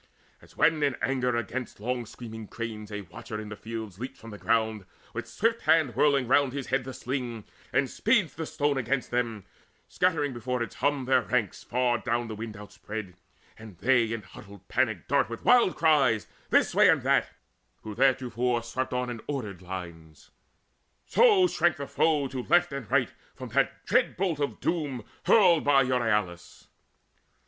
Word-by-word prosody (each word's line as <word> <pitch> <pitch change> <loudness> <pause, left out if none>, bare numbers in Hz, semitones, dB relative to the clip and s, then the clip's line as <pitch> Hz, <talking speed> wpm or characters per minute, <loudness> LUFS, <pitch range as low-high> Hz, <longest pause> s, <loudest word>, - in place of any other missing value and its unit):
As - - -20
when 155 -2 +3
in 140 -2 +2
anger 125 -2 0
against 120 +1 -4
long 120 +1 -3
screaming 110 -2 -9
cranes 110 -2 -6
A 105 0 -4
watcher 110 +4 -8
of 105 - -7
the 105 - -6
field 110 -3 -7
leaps 125 +2 -7
from 115 - -11
the 105 - -9
ground, 110 -2 0 0.3
In - - -4
swift 230 +1 0
hand 155 -7 +3
whirling 140 -2 +3
round 135 0 +3
his 140 -2 -4
head 130 -1 0
the 130 - -5
sling, 125 -4 -4 0.3
And 140 - +2
speeds 210 - +1
the 160 -1 -5
stone 145 -2 0
against 130 +1 -1
them, 115 -4 -1 0.4
scattering 155 -6 0
Before 125 +1 -2
its 115 - -7
hum 140 -1 0
their 130 - +4
ranks 120 -6 -1
far 120 -1 +1
down 120 0 -1
the 110 - -5
wind 110 -1 -7
Outspread, 105 -1 -8 0.5
and 110 -5 -12
they 120 -1 +2
in 115 -2 -4
huddled 100 +1 -14
panic 110 -8 0
dart 140 -2 +2
With 115 - -8
wild 245 -7 +5
cries 140 -9 +3 0.2
this - - +3
way - - +6
and - - +3
that, - - +2 0.5
who 110 - -6
theretofore 125 -1 +1
Swept 130 +2 -3
on 125 0 -1
in 115 -2 -7
ordered 105 -11 -4
lines; 85 -4 -9 0.7
so 420 -6 +5
shrank 175 - +1
the 140 - -4
foe 150 -1 +1
To 130 -1 -4
right 175 +6 +3
and 135 -6 -6
left - - +1 0.2
from - - -8
that - - 0
dread - - +2
bolt 175 -5 -1
of 145 - -2
doom 145 -9 -2 0.2
Hurled 175 -9 +5
of 135 -2 +5
Euryalus. 105 -9 -1
125 Hz, 175 wpm, -27 LUFS, 110-140 Hz, 0.7 s, way